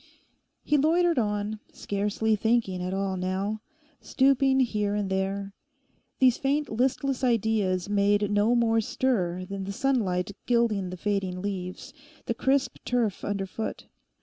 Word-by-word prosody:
He 295 - +2
loitered 330 +1 +3
on, 210 -1 -1
scarcely 210 +2 -1
thinking 220 -4 +1
at 180 0 -3
all 195 0 -1
now, 190 +4 -2 0.4
stooping 270 0 +3
here 210 -4 0
and 205 -2 -2
there. 195 +1 -2 0.6
These 255 -2 +4
faint 285 +2 0
listless 260 +3 0
ideas 215 -6 +1
made 205 0 +2
no 205 +4 +3
more 225 -1 +3
stir 185 -7 -1
than 195 0 -5
the 200 - -4
sunlight 200 -6 0 0.2
gilding 230 -6 +2
the 185 - -6
fading 195 -2 -1
leaves, 185 -2 -5 0.3
the - - -1
crisp 265 +2 +1
turf 235 -5 -1
underfoot. 200 +2 -4
210 Hz, 130 wpm, -27 LUFS, 195-245 Hz, 0.6 s, These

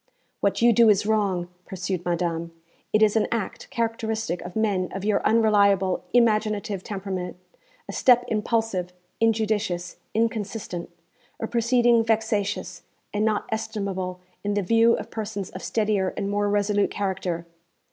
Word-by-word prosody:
'What - - +1
you 235 0 +7
do 230 0 +6
is 205 0 +3
wrong,' 200 -5 +1 0.2
pursued 185 -1 -3
madame; 170 -1 -1 0.4
'it 215 0 +4
is 210 0 +4
an 220 - +3
act 230 -5 -3
characteristic 225 -4 -2
of 180 0 -8
men 200 -5 +1
of 195 +1 -4
your 210 -1 +2
unreliable, 200 -4 +3
imaginative 215 -4 +2
temperament 190 -3 -4 0.5
a - - -6
step 245 -1 +4
impulsive, 215 -5 -1 0.3
injudicious, 215 -5 0 0.2
inconsistent 215 -5 -2 0.5
a - - -2
proceeding 235 0 +3
vexatious, 210 -5 -1 0.3
and 210 +1 0
not 215 -1 +1
estimable 195 -5 -3 0.2
in 205 0 -1
the 205 - +1
view 230 +4 +4
of - - -7
persons 210 -3 -4
of 185 - -8
steadier 210 -4 0
and 200 - -2
more 205 0 +1
resolute 205 0 +2
character.' 185 -4 -2
205 Hz, 135 wpm, -25 LUFS, 190-220 Hz, 0.5 s, you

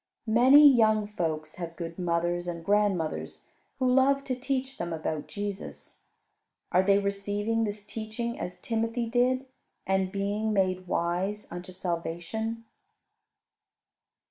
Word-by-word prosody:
Many 255 +6 +7
young 220 -5 +5
folks 160 -6 -3
have 170 -2 -6
good 165 0 -6
mothers 175 0 0
and 170 -1 -5
grandmothers, 200 -5 0 0.3
who 260 -2 +1
love 270 +2 +4
to 255 - -2
teach 265 +1 -3
them 170 0 -3
about 155 -1 -3
Jesus. 205 -1 -6 0.7
Are 180 - +5
they 195 +1 +4
receiving 205 +3 -1
this 205 0 -5
teaching 225 +2 -4
as 180 - -5
Timothy 230 +1 -1
did, 250 +3 +1 0.4
and 190 -1 +1
being 205 +2 -1
made 185 -2 +1
wise 185 +5 -1
unto 175 +1 -7
salvation? 185 +6 -4
205 Hz, 120 wpm, -28 LUFS, 175-230 Hz, 0.7 s, Many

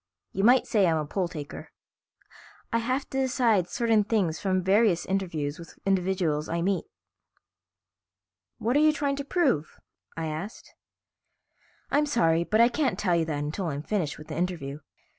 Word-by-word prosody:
"You 195 - -2
might 245 +4 +5
say 210 -7 +3
I'm 165 -1 +2
a 155 - -2
poll 180 +4 -1
taker. 150 -5 -8 1.0
I 230 - +3
have 255 +4 -1
to 270 - -1
decide 235 -8 +2
certain 225 -1 +2
things 200 -7 0
from 185 -2 0
various 195 -1 +3
interviews 170 -6 -2
with 170 - -12
individuals 180 -5 0
I 170 0 -1
meet." 190 -1 0 1.7
"What 240 +4 0
are - - +5
you 305 0 +5
trying 280 -2 -1
to 280 - -3
prove?" 275 - 0 0.4
I 165 - -2
asked. 160 +7 -6 1.2
"I'm 295 +1 +3
sorry, 170 - +2
but 215 +5 +1
I 235 - +7
can't 270 +3 0
tell 180 -4 +1
you 165 -1 +1
that 155 -2 -2
until 160 +5 -3
I'm 145 -2 -3
finished 175 -6 -2
with 150 - -12
the 155 - -5
interview. 160 -5 -3
190 Hz, 165 wpm, -27 LUFS, 160-235 Hz, 1.7 s, I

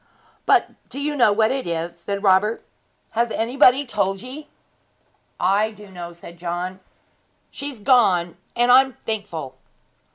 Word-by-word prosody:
'But - - +4 0.2
do 275 - -5
you 295 +1 -1
know 240 -6 +5
what 220 +1 +2
it 265 -5 -2
is?' 170 0 -3
said 200 +4 -5
Robert. 200 +3 +3 0.5
'Has 235 +1 0
anybody 255 +4 +3
told 195 -5 -1
ye?' 270 +4 -9 0.9
'I 200 +4 +2
do 210 -1 -14
know,' 175 -2 -8
said 170 0 -13
John. 180 +2 -4 0.7
'She's 280 -4 -6
gone; 200 -7 +3 0.2
and 240 +1 +3
I 255 +1 +9
am 265 -1 -6
thankful!' 165 -11 -4
210 Hz, 140 wpm, -22 LUFS, 180-250 Hz, 0.9 s, I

